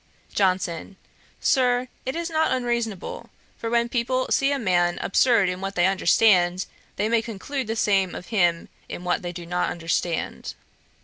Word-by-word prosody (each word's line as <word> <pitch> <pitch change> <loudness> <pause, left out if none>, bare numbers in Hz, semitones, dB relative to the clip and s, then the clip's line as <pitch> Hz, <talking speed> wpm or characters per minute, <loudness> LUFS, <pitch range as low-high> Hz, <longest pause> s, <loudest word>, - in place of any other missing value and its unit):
JOHNSON. 185 -1 0 0.4
'Sir, 250 -3 +2 0.2
it 260 - -2
is 335 0 -3
not 315 0 +2
unreasonable; 235 -6 -2 0.3
for 230 - -4
when 235 0 +2
people 255 +2 0
see 275 +1 +3
a 285 - +1
man 175 -7 +1
absurd 225 -1 +3
in 180 +1 -3
what 195 0 -4
they 175 - +3
understand, 185 -1 +3 0.3
they 210 - 0
may 230 0 +2
conclude 235 +4 -5
the 225 - -2
same 195 -4 +1
of - - -8
him 175 -6 +1 0.2
in 175 - -6
what 180 0 0
they 175 - -4
do 175 -1 -8
not 180 +1 -1
understand. 170 0 -2
200 Hz, 165 wpm, -24 LUFS, 180-240 Hz, 0.4 s, see